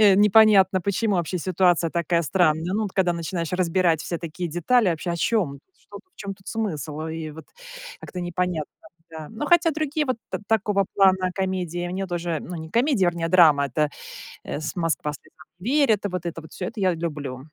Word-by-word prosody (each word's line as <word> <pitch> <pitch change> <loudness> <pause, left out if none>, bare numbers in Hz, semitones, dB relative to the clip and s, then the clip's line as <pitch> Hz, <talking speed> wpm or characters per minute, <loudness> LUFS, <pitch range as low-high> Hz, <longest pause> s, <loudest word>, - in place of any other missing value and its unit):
э, 205 -3 +7
непонятно, 205 -2 +5
почему 200 +3 0
вообще 175 +1 -1
ситуация 175 -1 +2
такая 170 0 0
странная. 165 0 +1
Ну, 220 - 0
вот 205 -3 -4
когда 180 -2 +2
начинаешь 170 0 -4
разбирать 180 -2 +1
все 170 - -4
такие 170 +1 -5
детали, 185 +8 +2
вообще, 170 +1 -2
о 170 - -2
чём, 170 -7 0 0.2
что, - - -13
в 370 0 -25
чём 200 -1 -6
тут 190 0 -26
смысл? 155 - -3
И 160 -1 -5
вот 160 +2 -11 0.6
как-то 180 - -7
непонятно. 175 -3 -2 0.4
Да. 160 -1 -8
Но 225 +7 -5
хотя 345 0 +4
другие 310 0 -1
вот 255 -4 -2
та - - -3
такого 210 -2 +1
плана 190 -2 +4
комедии 180 -2 -2
мне 190 +2 -3
тоже, 170 -2 -3
ну, 175 - -7
не 160 0 -7
комедия, 235 - +2
вернее 170 -1 -1
драма, 160 -5 +6
это, 150 +3 0 0.6
э, - - -4
с 155 0 -5
"Москва 165 -4 -1
слезам 155 +2 -15
не 200 +7 -4 0.2
верит". 215 -5 +1
И - - -7
вот 180 -2 -5
это 165 -1 -4
вот 160 - -14
всё, 185 - -5
это 225 - -6
я 185 -3 +2
люблю. 150 -6 -5
180 Hz, 200 wpm, -24 LUFS, 165-195 Hz, 0.6 s, э